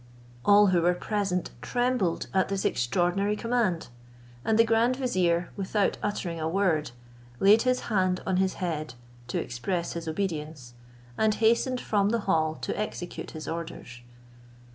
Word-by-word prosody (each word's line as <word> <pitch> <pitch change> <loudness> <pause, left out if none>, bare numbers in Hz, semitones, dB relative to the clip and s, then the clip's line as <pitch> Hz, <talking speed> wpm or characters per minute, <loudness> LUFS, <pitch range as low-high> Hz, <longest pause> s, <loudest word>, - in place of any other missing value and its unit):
All 205 0 +6
who 175 - +4
were 175 +1 +3
present 195 -2 -2
trembled 245 -8 0
at 190 -1 +2
this 195 -1 -2
extraordinary 175 +11 +1
command; 230 - 0 0.5
and 220 +6 +2
the 230 - +7
grand 230 +2 +2
vizier, 180 -10 0
without 200 0 0
uttering 180 -5 -3
a 160 0 -1
word, 175 -5 +1 0.5
laid 210 +3 +6
his 255 0 +1
hand 185 -4 +1
on 190 -1 +1
his 190 0 +1
head, 155 -7 -3 0.3
to 120 - -2
express 170 +9 -3
his 170 -1 -6
obedience, 155 -7 -4 0.5
and 215 -1 +3
hastened 235 +3 +2
from 205 -3 +1
the 230 0 0
hall 160 -5 +1
to - - -2
execute 210 -4 -5
his 155 - -7
orders. 160 -7 -6
190 Hz, 145 wpm, -27 LUFS, 170-215 Hz, 0.5 s, the